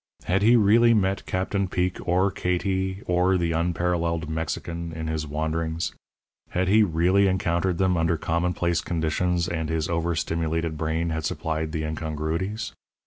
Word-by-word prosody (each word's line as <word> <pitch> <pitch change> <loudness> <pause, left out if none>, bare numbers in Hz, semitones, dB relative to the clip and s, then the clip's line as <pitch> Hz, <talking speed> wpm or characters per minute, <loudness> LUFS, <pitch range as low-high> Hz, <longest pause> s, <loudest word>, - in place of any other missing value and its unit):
Had 95 +2 +1
he 115 +4 +6
really 115 +2 +5
met 95 -2 0
Captain 95 +1 -1
Peek 90 0 -1
or 95 +3 +3
Katie 95 +2 -1
or 90 +1 +2
the 85 -1 0
unparalleled 85 0 0
Mexican 85 +1 -3
in 80 0 -5
his 80 -1 -2
wanderings 80 +2 -2 0.6
had 90 +1 0
he 105 +4 +5
really 95 +1 +3
encountered 90 -1 0
them 95 -1 +2
under 80 0 +1
commonplace 85 +1 0
conditions 85 +1 0
and 80 -2 -2
his 80 -1 -1
over 85 0 0
stimulated 80 0 -1
brain 80 +2 -1
had 80 0 -2
supplied 80 +1 -2
the 80 -1 -2
incongruities? 80 +7 -3
85 Hz, 145 wpm, -25 LUFS, 80-95 Hz, 0.6 s, he